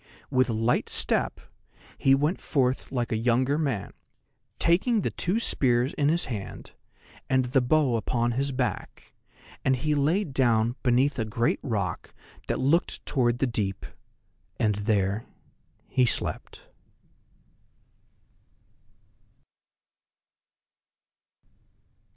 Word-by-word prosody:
With 130 Hz, 0 st, +2 dB
a -, -, 0 dB
light 115 Hz, +2 st, 0 dB
step -, -, 0 dB, 0.6 s
he 135 Hz, 0 st, +4 dB
went 150 Hz, +6 st, 0 dB
forth 130 Hz, -3 st, 0 dB
like 120 Hz, -3 st, -2 dB
a -, -, +1 dB
younger 125 Hz, +6 st, +1 dB
man, 130 Hz, -11 st, -2 dB, 0.6 s
taking 200 Hz, +7 st, +3 dB
the -, -, -2 dB
two 190 Hz, +6 st, -1 dB
spears 125 Hz, -, +2 dB
in 145 Hz, 0 st, +1 dB
his 170 Hz, +2 st, +2 dB
hand, 105 Hz, -6 st, -7 dB, 0.6 s
and 130 Hz, -1 st, +2 dB
the 130 Hz, +2 st, +2 dB
bow 135 Hz, -1 st, +2 dB
upon 120 Hz, +2 st, 0 dB
his 135 Hz, +4 st, -1 dB
back, 130 Hz, -1 st, -4 dB, 0.5 s
and 130 Hz, -, +3 dB
he 150 Hz, +4 st, -1 dB
lay 155 Hz, +8 st, +2 dB
down 120 Hz, -, +1 dB
beneath 130 Hz, +2 st, +2 dB
a -, -, +1 dB
great 115 Hz, +2 st, 0 dB
rock 100 Hz, -, -3 dB, 0.3 s
that -, -, -1 dB
looked 145 Hz, +7 st, +1 dB
toward 120 Hz, -3 st, +1 dB
the 135 Hz, -, +1 dB
deep, 105 Hz, -5 st, -3 dB, 0.7 s
and 105 Hz, -2 st, +2 dB
there 100 Hz, 0 st, -1 dB, 0.6 s
he 125 Hz, -1 st, +2 dB
slept. -, -, -3 dB
125 Hz, 110 wpm, -26 LUFS, 115-140 Hz, 0.7 s, he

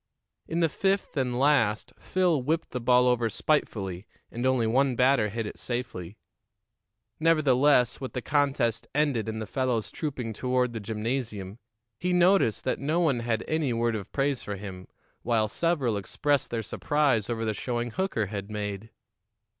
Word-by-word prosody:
In 165 Hz, +2 st, -1 dB
the 165 Hz, -, +4 dB
fifth 195 Hz, +3 st, -1 dB
and 125 Hz, -3 st, 0 dB
last, 130 Hz, -7 st, +2 dB
Phil 180 Hz, -6 st, +1 dB
whipped 160 Hz, +6 st, -1 dB
the 125 Hz, -, -3 dB
ball 125 Hz, +1 st, +4 dB
over 120 Hz, -2 st, +2 dB
spitefully, 100 Hz, -, -1 dB, 0.2 s
and 120 Hz, +2 st, -1 dB
only 130 Hz, -3 st, +2 dB
one 130 Hz, +3 st, +2 dB
batter 125 Hz, -3 st, +3 dB
hit 115 Hz, +2 st, -3 dB
it 105 Hz, -, -7 dB
safely. 110 Hz, -6 st, -4 dB, 1.0 s
Nevertheless, 145 Hz, -6 st, +3 dB
with 130 Hz, -, -5 dB
the 125 Hz, -, -3 dB
contest 140 Hz, -6 st, +1 dB
ended 140 Hz, -7 st, +1 dB
and 110 Hz, 0 st, -4 dB
the 110 Hz, -, -4 dB
fellows 115 Hz, -3 st, -1 dB
trooping 130 Hz, -7 st, -4 dB
toward 125 Hz, +1 st, 0 dB
the 115 Hz, -, -4 dB
gymnasium, 110 Hz, -1 st, -4 dB, 0.4 s
he 180 Hz, +1 st, 0 dB
noticed 180 Hz, -, +3 dB
that 130 Hz, -, -1 dB
no 155 Hz, +5 st, 0 dB
one 150 Hz, -8 st, +2 dB
had 115 Hz, -1 st, -1 dB
any 155 Hz, -5 st, 0 dB
word 115 Hz, 0 st, 0 dB
of 100 Hz, -3 st, -6 dB
praise 140 Hz, -2 st, 0 dB
for 105 Hz, -, -5 dB
him, 95 Hz, -2 st, -8 dB, 0.3 s
while 115 Hz, -2 st, +1 dB
several 135 Hz, -4 st, 0 dB
expressed 140 Hz, +7 st, 0 dB
their 115 Hz, -1 st, -2 dB
surprise 135 Hz, -1 st, +1 dB
over 115 Hz, -1 st, -2 dB
the 110 Hz, -, 0 dB
showing 120 Hz, +1 st, -3 dB
Hooker 155 Hz, -, -1 dB
had 100 Hz, 0 st, -6 dB
made. 105 Hz, 0 st, -4 dB
125 Hz, 160 wpm, -27 LUFS, 110-145 Hz, 1.0 s, the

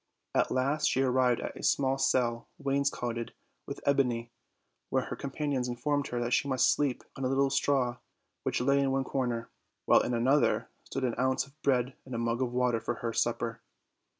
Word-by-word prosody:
At -, -, +2 dB
last 140 Hz, +4 st, +1 dB
she 135 Hz, -, +2 dB
arrived 125 Hz, -2 st, +2 dB
at -, -, -5 dB
a -, -, -9 dB
small 135 Hz, 0 st, +2 dB
cell 120 Hz, -3 st, +1 dB
wainscoted 135 Hz, -4 st, -1 dB, 0.3 s
with -, -, -6 dB
ebony, 125 Hz, -4 st, +1 dB, 0.6 s
where -, -, +1 dB
her -, -, -5 dB
companions 140 Hz, -2 st, -2 dB
informed 140 Hz, +4 st, -1 dB
her 120 Hz, 0 st, -2 dB
she 140 Hz, -, +2 dB
must 130 Hz, -2 st, +4 dB
sleep 140 Hz, -4 st, -1 dB
on 135 Hz, -, -5 dB
a -, -, +2 dB
little 135 Hz, +1 st, +2 dB
straw 135 Hz, -2 st, +1 dB, 0.4 s
which -, -, -1 dB
lay 140 Hz, +2 st, +3 dB
in 140 Hz, -1 st, +2 dB
one 135 Hz, 0 st, +1 dB
corner; 120 Hz, -4 st, -2 dB, 0.3 s
while -, -, +6 dB
in 125 Hz, -, -1 dB
another 130 Hz, +5 st, +2 dB
stood 135 Hz, -, -4 dB
an 125 Hz, -2 st, +1 dB
ounce 130 Hz, +1 st, +1 dB
of 140 Hz, +3 st, -23 dB
bread 130 Hz, -2 st, +1 dB
and 130 Hz, -2 st, -7 dB
a -, -, -1 dB
mug 115 Hz, +1 st, -1 dB
of 125 Hz, -2 st, 0 dB
water 125 Hz, -2 st, +1 dB
for 120 Hz, -, -3 dB
her 115 Hz, -1 st, -3 dB
sup 120 Hz, +1 st, +1 dB
per. 115 Hz, -1 st, -4 dB
130 Hz, 190 wpm, -30 LUFS, 120-135 Hz, 0.6 s, while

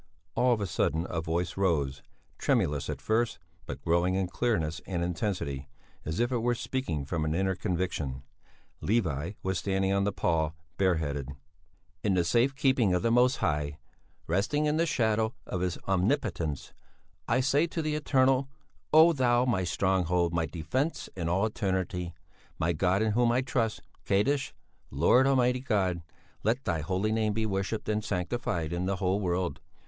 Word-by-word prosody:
All 125 Hz, 0 st, +3 dB
of 115 Hz, -, +2 dB
a -, -, 0 dB
sudden 80 Hz, -2 st, 0 dB
a 80 Hz, -, -1 dB
voice 80 Hz, +1 st, -2 dB
rose, 75 Hz, -8 st, +1 dB, 0.4 s
tremulous 75 Hz, -1 st, +1 dB
at -, -, -3 dB
first, 115 Hz, +1 st, 0 dB, 0.3 s
but -, -, -6 dB
growing 85 Hz, +2 st, +2 dB
in 95 Hz, 0 st, +1 dB
clearness 90 Hz, -5 st, -1 dB
and 85 Hz, -3 st, -1 dB
intensity, 80 Hz, -7 st, -2 dB, 0.4 s
as 80 Hz, +1 st, -3 dB
if 120 Hz, +2 st, +1 dB
it 125 Hz, -, +1 dB
were 120 Hz, +1 st, +1 dB
speaking 100 Hz, -, -3 dB
from 80 Hz, +3 st, -2 dB
an 80 Hz, +1 st, 0 dB
inner 95 Hz, +1 st, +1 dB
conviction. 85 Hz, -9 st, -2 dB, 0.6 s
Levi 90 Hz, -, 0 dB
was 95 Hz, -2 st, 0 dB
standing 95 Hz, +1 st, 0 dB
on 100 Hz, 0 st, +2 dB
the 100 Hz, -, +1 dB
pall, 80 Hz, -4 st, 0 dB, 0.2 s
bare 95 Hz, -2 st, +3 dB
headed: 70 Hz, -4 st, -3 dB, 0.7 s
"In 100 Hz, -3 st, +2 dB
the 90 Hz, -, +3 dB
safe 120 Hz, +10 st, +2 dB
keeping 130 Hz, -9 st, +3 dB
of 90 Hz, -, 0 dB
the 115 Hz, -, +2 dB
Most 125 Hz, +2 st, +4 dB
High, 75 Hz, -1 st, -1 dB, 0.5 s
resting 105 Hz, -, +1 dB
in 150 Hz, +1 st, +1 dB
the 165 Hz, +1 st, +2 dB
shadow 110 Hz, -4 st, +1 dB
of 90 Hz, -, -3 dB
His 90 Hz, -2 st, -1 dB
omnipotence, 95 Hz, -, 0 dB, 0.5 s
I 120 Hz, +2 st, +2 dB
say 145 Hz, +5 st, +3 dB
to 165 Hz, -1 st, -3 dB
the 155 Hz, 0 st, -1 dB
Eternal: 135 Hz, -2 st, +2 dB, 0.4 s
Oh, 160 Hz, +2 st, +7 dB
Thou 125 Hz, -3 st, +3 dB
my 110 Hz, -7 st, +1 dB
stronghold, 90 Hz, -1 st, +1 dB
my 85 Hz, -1 st, 0 dB
defence 90 Hz, -, -2 dB
in 85 Hz, -3 st, -2 dB
all 95 Hz, +5 st, +2 dB
eternity, 95 Hz, -4 st, -2 dB, 0.4 s
my 85 Hz, +2 st, +1 dB
God 95 Hz, +5 st, +2 dB
in 110 Hz, -, +1 dB
whom 120 Hz, +2 st, +3 dB
I 125 Hz, +2 st, +2 dB
trust 115 Hz, -4 st, -1 dB, 0.2 s
Kaddisch. 135 Hz, +8 st, +2 dB, 0.4 s
Lord, 105 Hz, -, +4 dB
Almighty 125 Hz, -2 st, +3 dB
God, 95 Hz, -8 st, 0 dB, 0.4 s
let 115 Hz, +5 st, 0 dB
Thy 85 Hz, -2 st, 0 dB
holy 95 Hz, +6 st, -1 dB
name 110 Hz, -1 st, +1 dB
be 110 Hz, +1 st, -1 dB
worshipped 100 Hz, +1 st, -2 dB
and 105 Hz, 0 st, 0 dB
sanctified 90 Hz, -4 st, -2 dB
in 90 Hz, +1 st, -1 dB
the 100 Hz, -, 0 dB
whole 95 Hz, +1 st, 0 dB
world. 90 Hz, -5 st, -1 dB
95 Hz, 170 wpm, -29 LUFS, 85-120 Hz, 0.7 s, Oh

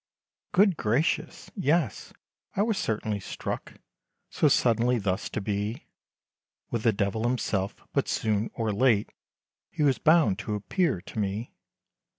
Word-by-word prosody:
Good 190 Hz, -2 st, +4 dB
gracious! 125 Hz, +10 st, 0 dB
yes, 165 Hz, -, 0 dB, 0.4 s
I 200 Hz, -, +3 dB
was 220 Hz, -3 st, 0 dB
certainly 110 Hz, -1 st, -1 dB
struck, 95 Hz, -, -5 dB, 0.6 s
So -, -, +3 dB
suddenly 120 Hz, +1 st, +3 dB
thus 95 Hz, -3 st, -1 dB
to -, -, -3 dB
be 105 Hz, +3 st, -3 dB, 0.9 s
With 115 Hz, -, -1 dB
the 115 Hz, -, +4 dB
Devil 100 Hz, +1 st, -1 dB
himself! 110 Hz, -5 st, 0 dB, 0.2 s
but -, -, +1 dB
soon, 110 Hz, 0 st, 0 dB
or 110 Hz, -2 st, -1 dB
late, 110 Hz, -1 st, +3 dB, 0.6 s
He 150 Hz, -, -2 dB
was 135 Hz, -3 st, +3 dB
bound 155 Hz, -, +4 dB
to 105 Hz, 0 st, -3 dB
appear 105 Hz, -, 0 dB
to 110 Hz, -, -7 dB
me. 105 Hz, +3 st, -3 dB
110 Hz, 135 wpm, -27 LUFS, 105-140 Hz, 0.9 s, Good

